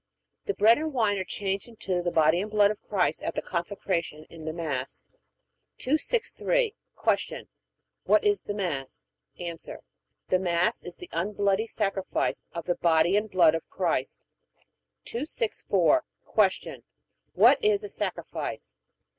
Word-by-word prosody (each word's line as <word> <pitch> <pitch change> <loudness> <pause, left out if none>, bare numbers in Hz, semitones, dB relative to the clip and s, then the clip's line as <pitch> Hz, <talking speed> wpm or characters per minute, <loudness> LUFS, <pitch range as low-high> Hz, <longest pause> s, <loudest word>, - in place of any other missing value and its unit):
The 410 - -1
bread 225 +5 +6
and 315 0 -2
wine 210 -5 +2
are - - -1
changed 195 +2 -3
into 195 -6 -3
the 175 - 0
body 160 +1 +3
and 210 - -4
blood 205 -1 +4
of 215 - -7
Christ 195 -4 +1
at - - -3
the - - -1
Consecration 170 -3 -3
in 160 -2 -10
the 155 - -2
Mass. 150 -6 -4 0.7
263. 460 - +1 0.3
Q. - - 0 0.6
What - - +4
is 410 -1 +2
the 205 - -5
Mass? 150 -10 -4 0.3
A. 170 -1 -4 0.7
The 185 - +2
Mass 175 -1 +1
is 175 - -7
the 180 - -10
unbloody 200 +4 0
sacrifice 195 -4 -1
of 170 -2 -6
the 180 - +1
body 170 +2 +3
and 210 +1 +1
blood 175 -5 +5
of 165 - -4
Christ. - - -2 0.8
264. 235 - +1 0.6
Q. - - -9 0.5
What - - +5
is 425 0 +3
a 415 - -6
sacrifice? - - -4
195 Hz, 140 wpm, -27 LUFS, 170-220 Hz, 0.8 s, bread